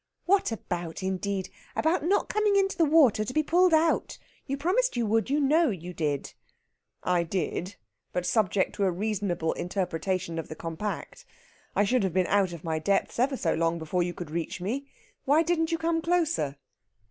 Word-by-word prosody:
"What 385 -6 +3
about, 175 -5 -4
indeed? 190 0 -2 0.3
About 320 0 +1
not 380 +5 +2
coming 425 -1 +2
into 390 -1 +2
the 335 -2 +3
water 285 -9 +5
to 215 - -5
be 310 - +3
pulled 355 +4 +4
out. 320 0 +2 0.3
You 275 0 -2
promised 385 - +1
you 235 - +1
would, 225 +3 +1
you 290 +2 +2
know 305 +3 +4
you 180 -3 -5
did!" 150 -4 -2 0.7
"I 180 -1 +2
did; 180 +2 -3 0.4
but 180 0 -2
subject 205 -2 +1
to 200 - +2
a 185 - +2
reasonable 185 -4 -1
interpretation 180 -1 -2
of 160 - -5
the 155 - -7
compact. 170 - -5 0.5
I - - +4
should 245 +4 +2
have 190 -4 -1
been 185 0 +2
out 195 -2 +2
of 170 -2 -8
my 160 -2 -1
depth 195 +7 0
ever 265 +2 +2
so 165 - 0
long 165 +1 +1
before 165 +3 -1
you 175 0 -2
could 170 -4 -7
reach 170 +2 -3
me. 250 +10 -3 0.4
Why 295 +4 +4
didn't 330 0 0
you 330 - +1
come 325 0 0
closer?" 330 - 0
205 Hz, 185 wpm, -27 LUFS, -, 0.7 s, water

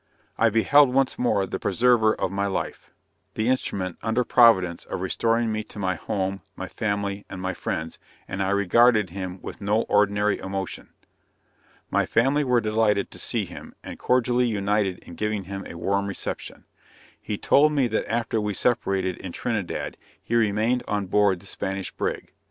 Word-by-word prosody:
I 115 - +3
beheld 125 +5 +5
once 135 0 +1
more 105 -5 +2
the - - -5
preserver 110 +1 +3
of 90 - -2
my 100 +1 -1
life; 95 - -4 0.5
the 110 - 0
instrument, 100 -8 -1
under 115 +2 +1
Providence, 95 -10 +4
of - - -5
restoring 115 0 0
me 110 0 -2
to - - -14
my 95 -2 0
home, 95 +3 -3
my - - -6
family, 100 -1 -2
and 95 - -7
my 95 +1 -2
friends, 80 -1 -4 0.3
and 95 0 -4
I 95 - 0
regarded 100 +1 +4
him 95 0 -5
with - - -8
no 105 +3 +1
ordinary 105 0 +2
emotion. 95 -1 -5 1.0
My - - +2
family 135 +5 +2
were 125 -3 +3
delighted 105 -1 +1
to - - -11
see - - -1
him, - - -11
and - - -8
cordially 125 0 +2
united 100 -3 0
in - - -12
giving 105 +2 -2
him 95 +1 -7
a - - -9
warm 100 +3 0
reception. 100 - -6 0.6
He 105 - -4
told 150 +7 +4
me 140 -3 +2
that 110 - -2
after 115 -1 0
we 105 -1 -2
separated 95 -6 0
in 95 - -7
Trinidad, 105 -7 -3 0.2
he - - -7
remained 115 +2 +2
on 105 -1 -1
board 100 -1 +2
the 100 - -16
Spanish 95 -1 -4
brig. - - -4
105 Hz, 170 wpm, -25 LUFS, 95-115 Hz, 1.0 s, beheld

